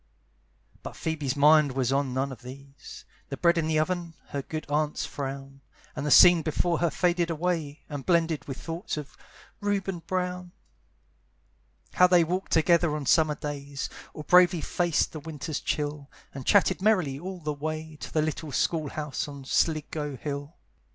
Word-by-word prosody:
But - - -8
Phoebe's 150 -5 -2
mind 150 -1 +5
was 130 -1 0
on 135 -1 0
none 135 +2 -1
of 125 -3 -10
these: 135 +1 -12 0.2
The - - -5
bread 170 0 +3
in 155 - -1
the 160 -1 +1
oven, 170 +1 -1
her 140 - -3
good 155 +3 -6
aunt's 150 +1 -1
frown, 135 0 -6 0.3
And 145 - -3
the - - +1
scene 175 +3 +8
before 165 +2 0
her 170 - +2
faded 175 +2 +1
away, 165 -3 -2
And 145 -3 -6
blended 165 -2 +1
with 135 -2 -5
thoughts 165 - -5
of 150 -1 -7 0.4
Reuben 200 -3 -1
Brown: 180 0 -3 1.4
How 180 - +6
they 175 -1 +5
walked 180 +4 -3
together 165 -1 +3
on 150 -2 -4
summer 155 +3 +3
days, 145 -1 -5 0.2
Or 155 - -6
bravely 180 0 +5
faced 175 -1 0
the 155 - -7
winter's 155 -1 -5
chill, 145 -1 -3 0.2
And 135 -2 -8
chatted 190 -2 +4
merrily 180 -10 +2
all 185 +2 -6
the 150 -2 -3
way 155 +1 -5
To - - -8
the 155 - +1
little 155 -1 -3
school 155 +1 0
house 150 -2 -4
on 140 -2 -9
Sligo 150 -1 -1
Hill. 145 +2 -5
155 Hz, 165 wpm, -27 LUFS, 140-170 Hz, 1.4 s, scene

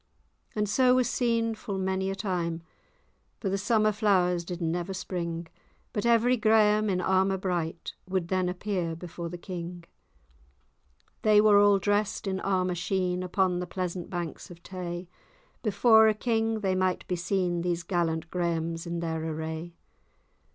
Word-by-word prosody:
And 210 -1 0
so 250 +4 +4
was 255 -2 +3
seen 230 -2 +1
full 205 -2 -5
many 190 0 -1
a 195 - -2
time; 175 -4 -2 0.8
For 195 - -2
the 195 - 0
summer 215 +1 +3
flowers 185 -5 +2
did 175 0 -6
never 175 +2 -2
spring, 170 -3 -4 0.5
But 210 +2 -1
every 235 +2 +4
Graham, 215 -1 +4
in 185 -2 +1
armour 190 +1 +2
bright, 175 -3 -3 0.2
Would 185 -2 -1
then 185 -1 +1
appear 180 -3 -2
before 170 0 -7
the 175 - -6
king. 175 -1 -7 1.4
They 215 -1 +5
were 210 -1 +6
all 205 -1 +6
drest 205 +1 0
in 190 -1 -1
armour 185 -2 0
sheen, 180 0 -1
Upon 185 0 +1
the 180 - -4
pleasant 180 -1 -4
banks 175 0 -5
of 170 -1 -13
Tay; 180 -1 -6 0.5
Before 220 +1 +5
a 215 - +3
king 225 -1 0
they 190 -2 +1
might 185 -1 0
be 180 - -1
seen, 175 -1 0
These 175 -1 -1
gallant 165 -2 -1
Grahams 170 -1 -2
in 170 0 -3
their 160 -1 -2
array. 160 +1 -5
185 Hz, 155 wpm, -28 LUFS, 175-205 Hz, 1.4 s, were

